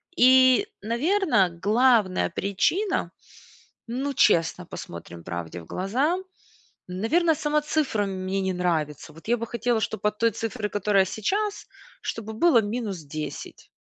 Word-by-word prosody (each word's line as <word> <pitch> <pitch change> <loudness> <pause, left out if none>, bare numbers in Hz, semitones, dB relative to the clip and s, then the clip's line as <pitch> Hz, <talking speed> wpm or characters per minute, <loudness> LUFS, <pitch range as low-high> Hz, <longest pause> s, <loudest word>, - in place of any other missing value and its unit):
И, 260 +7 +6
наверно, 245 - +2
главная 210 +2 +2
причина, 200 - 0 0.8
ну, 270 +4 -2
честно 170 -4 +3
посмотрим 85 - -9
правде 85 -1 -6
в 80 - -14
глаза, 260 - 0 0.7
наверно, 305 - +1
сама 300 +1 0
цифра 295 -8 0
мне 190 0 -3
не 190 -1 -1
нравится. 160 -4 -2
Вот 165 +7 -15
я 240 - +3
бы 230 - -4
хотела, 235 -1 0
чтобы 210 -1 -1
от 210 0 -6
той 230 0 +3
цифры, 225 0 -3
которая 205 -1 +2
сейчас, 400 - -2 0.4
чтобы 220 -1 -5
было 290 0 +5
минус 210 -2 -3
10. 150 +1 -7
220 Hz, 130 wpm, -25 LUFS, 185-260 Hz, 0.8 s, И